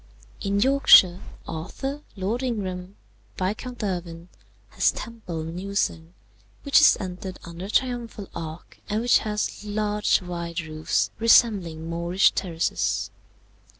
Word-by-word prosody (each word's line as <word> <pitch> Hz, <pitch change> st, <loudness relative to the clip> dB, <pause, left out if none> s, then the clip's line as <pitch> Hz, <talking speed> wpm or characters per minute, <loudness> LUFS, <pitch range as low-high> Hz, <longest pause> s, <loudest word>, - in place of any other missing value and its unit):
"In 200 Hz, 0 st, 0 dB
Yorkshire, 215 Hz, -8 st, +6 dB, 0.3 s
Arthur, 270 Hz, -, -5 dB
Lord 205 Hz, +5 st, -2 dB
Ingram, 195 Hz, -6 st, -4 dB, 0.4 s
Viscount 215 Hz, +6 st, -3 dB
Irwin, 175 Hz, -3 st, -4 dB, 0.4 s
has -, -, +2 dB
Temple 200 Hz, -9 st, -6 dB
Newsain, 165 Hz, -, -3 dB, 0.5 s
which 280 Hz, +1 st, +5 dB
is 305 Hz, -, +7 dB
entered 185 Hz, 0 st, -6 dB
under 170 Hz, +2 st, -8 dB
a -, -, -7 dB
triumphal 235 Hz, -4 st, -1 dB
arch 160 Hz, 0 st, -8 dB
and 215 Hz, +2 st, 0 dB
which 240 Hz, +1 st, +4 dB
has 210 Hz, -1 st, -3 dB
large 210 Hz, 0 st, +1 dB
wide 170 Hz, -1 st, -4 dB
roofs 155 Hz, -1 st, -1 dB
resembling 195 Hz, -8 st, +3 dB
Moorish 170 Hz, +3 st, +2 dB
terraces. 170 Hz, -3 st, -1 dB
190 Hz, 115 wpm, -25 LUFS, 170-220 Hz, 0.5 s, is